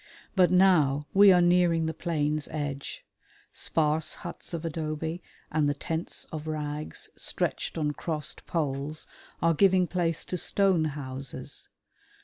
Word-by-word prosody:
But 185 -2 +5
now 165 -7 +4
we 200 0 +8
are 180 -1 +5
nearing 175 -2 +3
the 160 - -1
plain's 150 -3 -1
edge. 145 -2 -5 0.5
Sparse 155 0 +1
huts 175 - -6
of 170 -1 -4
adobe 160 +1 -3 0.3
and 150 -2 +2
the 145 - 0
tents 165 +3 -3
of 155 -1 -6
rags 150 -1 -3
stretched - - -2
on 150 -2 0
crossed 155 0 -4
poles 150 -2 -2 0.4
are 165 0 +4
giving 185 +1 +4
place 170 -2 -1
to 180 - -3
stone 190 -2 +2
houses. 135 -3 -4
160 Hz, 130 wpm, -28 LUFS, 150-175 Hz, 0.5 s, we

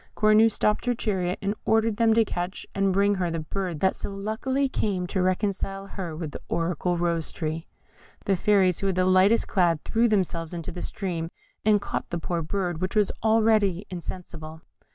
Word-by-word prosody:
Cornue 215 +1 +5
stopped 210 +2 0
her 245 - +2
chariot, 190 -6 -1
and 200 +1 0
ordered 220 -1 +2
them 225 -1 +4
to 225 -1 +4
catch 175 -1 -4
and 195 -1 +1
bring 200 +2 +3
to 195 - -3
her 180 -2 0
the 165 - -2
bird 175 0 -4
that 190 - +3
so - - -5
luckily 220 +8 -1
came 200 -8 -1
to 185 +1 -1
reconcile 195 +1 -1
her 185 -5 -6
with 155 -2 -5
the - - -8
oracular 175 +1 0
Rose 170 -2 0
tree. 160 0 -4 0.6
The 195 - +2
fairies 185 -2 +3
who 195 - -1
were 190 - +1
the 185 0 +2
lightest 185 +4 +4
clad 170 -5 +2
threw 230 +1 +2
themselves 175 -5 -1
into 165 -2 -5
the 175 - -7
stream, 170 -5 -3 0.3
and 210 -1 +4
caught - - -4
the 170 - -2
poor 170 0 -2
bird, 175 0 -2
which 185 +3 -2
was 210 -2 +3
already 215 -4 +3
insensible. 165 -3 -7
190 Hz, 195 wpm, -26 LUFS, 175-210 Hz, 0.6 s, Cornue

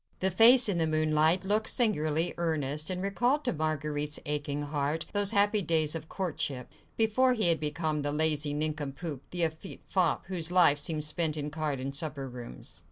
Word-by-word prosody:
The 190 +1 +1
face 235 +6 +7
in 190 -4 0
the 160 - +1
moonlight 155 +3 +2
looked 215 +3 +1
singularly 165 -8 +1
earnest, 155 -2 -1
and 185 0 -3
recalled 245 +9 0
to 245 - 0
Marguerite's 150 -1 -2
aching 145 0 -2
heart 145 +2 -2
those 205 -1 +2
happy 205 0 +3
days 160 -3 +1
of 160 -1 -6
courtship, 145 -8 -3 0.3
before 240 +4 +3
he 215 -7 +2
had 165 - +2
become 155 0 -2
the 145 0 -1
lazy 150 -1 +1
nincompoop, 150 -1 -4
the 175 -1 -2
effete 160 +4 -5
fop, 180 -4 0
whose 175 -2 -3
life 170 -5 +5
seemed 155 0 -3
spent 155 0 -1
in 150 0 -4
card 150 -3 -3
and 135 +1 -5
supper 145 -2 -4
rooms. 120 - -8
155 Hz, 175 wpm, -29 LUFS, 150-185 Hz, 0.3 s, face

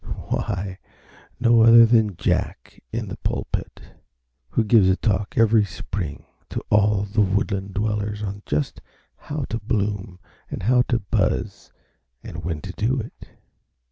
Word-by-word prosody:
Why, 95 +1 -2 0.6
no 115 -1 +5
other 115 +1 +9
than 110 -4 +3
Jack - - -2
in - - -3
the - - -6
pulpit, - - -4 0.7
who 115 - +1
gives 105 -3 +5
a 95 - +4
talk 100 +4 -1
every 115 -1 +5
spring 95 -5 -5 0.2
to - - -4
all 105 -1 +3
the 105 +2 0
woodland 100 0 -1
dwellers 105 0 -2
on 100 0 -5
just 75 -1 -2 0.3
how 145 -2 -5
to 115 - -2
bloom 100 -4 -2 0.3
and - - -6
how 125 +4 +4
to 120 - +2
buzz 100 -4 -1 0.5
and 85 +1 -8
when 80 -2 -3
to 95 - -6
do 120 +7 0
it. 115 - -9
105 Hz, 140 wpm, -23 LUFS, 95-115 Hz, 0.7 s, other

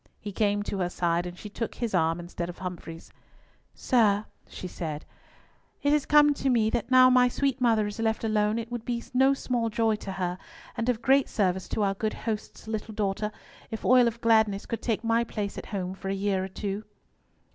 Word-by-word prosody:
He 205 - -6
came 205 0 +1
to 200 -1 -4
her 180 -1 0
side, 175 0 0
and 175 0 -8
she 210 - -8
took 225 +2 -5
his 235 -4 -3
arm 165 -1 +2
instead 175 0 -5
of 175 - -8
Humfrey's. 175 -3 -7 0.6
"Sir," 215 -5 +2 0.2
she 185 - -7
said; 155 -4 -5 0.8
"it 285 0 +3
has 300 -2 +1
come 295 -1 +6
to 275 -1 -1
me 225 -3 +3
that 240 -1 -2
now 255 0 +7
my 250 0 +6
sweet 270 +1 -1
mother 225 -3 +3
is 205 +2 -6
left 225 0 0
alone 215 0 +1
it 230 0 -5
would 240 -2 -4
be 235 -1 -3
no 265 +2 +4
small 240 -4 -1
joy 225 -1 +1
to 195 -2 -6
her, 180 -1 -3 0.4
and 230 +2 -1
of 235 -2 -1
great 270 +1 +4
service 190 -3 0
to 215 - 0
our 195 -1 +2
good 215 +2 -2
host's 220 -1 -5
little 220 0 -4
daughter, 210 +1 -1 0.4
if 220 - -6
Oil 250 -1 +6
of 235 0 -3
Gladness 220 -3 +3
could 230 -1 -4
take 225 -1 -1
my 230 +1 +2
place 210 -3 -4
at - - -7
home 185 -2 -3
for 195 0 -6
a 195 - 0
year 195 -1 0
or - - -3
two." 200 +2 -4
215 Hz, 210 wpm, -27 LUFS, 195-235 Hz, 0.8 s, now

